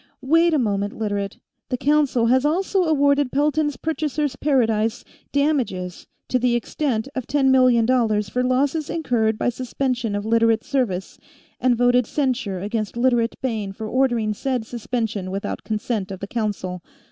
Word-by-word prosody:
"Wait 330 +5 +4
a 310 - +3
moment, 205 -4 -1
Literate. 205 -2 -2 0.3
The 250 - -1
Council 285 -4 +2
has 255 +3 +3
also 365 +4 +1
awarded 285 -3 +2
Pelton's 295 0 +1
Purchasers' 300 -3 -2
Paradise 230 -6 +1 0.3
damages 255 - -1 0.2
to 255 - +1
the 245 0 +2
extent 240 0 -1
of 260 -3 -4
ten 270 -2 +3
million 255 -3 +5
dollars, 225 -4 +2
for 250 +5 -1
losses 275 +4 +1
incurred 230 -9 0
by - - +1
suspension 245 -2 -2
of 205 0 -3
Literate 230 0 +3
service, 215 -10 -2 0.4
and 255 -1 +3
voted 245 0 +3
censure 250 -9 -1
against 215 +2 -3
Literate 240 -2 +2
Bayne 215 -6 -2
for 220 +2 -7
ordering 240 -3 +1
said 250 +1 -2
suspension 225 -4 -3
without 195 +1 -4
consent 215 -2 -2
of 190 -1 -6
the 200 - -4
Council. 200 -5 -3
245 Hz, 150 wpm, -22 LUFS, 215-275 Hz, 0.4 s, million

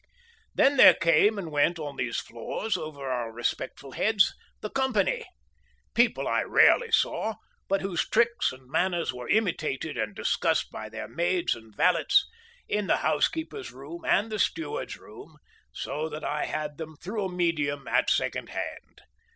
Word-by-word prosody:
Then 280 +1 +4
there - - +9
came 170 +6 +4
and 170 -5 -5
went 150 +4 +2
on 145 -3 -6
these 120 -2 -2
floors 155 - -4
over 155 -5 -6
our 120 -3 -2
respectful 120 +3 -4
heads, 205 - +3 0.3
the 215 - -5
Company; 270 - +1 0.7
people 235 0 +2
I - - +2
rarely 475 -2 +4
saw, 220 - +1 0.3
but 195 0 +1
whose 190 -3 -2
tricks 235 +1 +2
and 130 0 -14
manners 175 +1 0
were 125 -1 -8
imitated 160 - 0
and 105 -2 -2
discussed - - 0
by - - -7
their - - -6
maids 175 +1 0
and 110 -2 -13
valets 400 - +4 0.4
in 210 -1 -1
the - - +3
housekeeper's 315 - -1
room 145 +6 -10
and 220 +3 +2
the 215 - -3
steward's 160 -5 -2
room—so 145 - -8
that 150 0 -7
I 150 - -1
had 150 -1 -4
them 160 -1 -7
through 200 +6 -4
a 185 - -4
medium 150 -6 -1
at - - +2
second - - 0
hand. - - -7
165 Hz, 155 wpm, -27 LUFS, 145-210 Hz, 0.7 s, there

